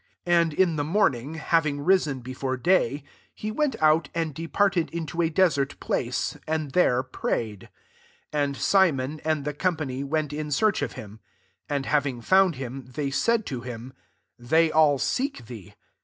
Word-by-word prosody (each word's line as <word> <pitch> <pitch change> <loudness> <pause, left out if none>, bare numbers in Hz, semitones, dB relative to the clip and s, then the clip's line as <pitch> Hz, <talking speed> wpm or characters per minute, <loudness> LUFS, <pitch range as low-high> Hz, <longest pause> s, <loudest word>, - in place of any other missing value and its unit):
35 175 -1 +4
And 160 - -4
in 175 -2 +3
the 145 - 0
morning, 150 - 0
hav 165 +1 +2
ing 145 -2 -2
risen 150 -6 +2
before 130 +1 -4
day, 145 -2 +1 0.3
he 215 - -4
went 280 +1 0
out, 155 -1 +3
and 165 -2 -1
departed 170 +3 0
into 170 0 -3
a 165 - +2
desert 160 -5 +1
place, - - -2
and 155 -2 -2
there 130 -7 +3
prayed. 110 -5 -3
SS. - - -19 0.6
And 145 -2 0
Simon, 155 -7 +2
and 155 -3 -1
his 150 -1 -3
company^ 150 -7 -1
went 150 0 -2
in 150 0 -4
search 205 +9 +2
of - - -2
him. 105 +1 -10 0.5
37 145 - -1
And 135 -1 -1
having 140 -5 0
found 190 +4 +4
him, 130 0 -6
they 135 +2 -3
said 230 +8 +1
to 130 -3 -4
him, 125 +1 -8 0.2
" - - -49
They 160 +7 +2
all 155 -2 +4
seek 260 - -2
thee.' 110 -6 -11
150 Hz, 175 wpm, -25 LUFS, 130-170 Hz, 0.6 s, 35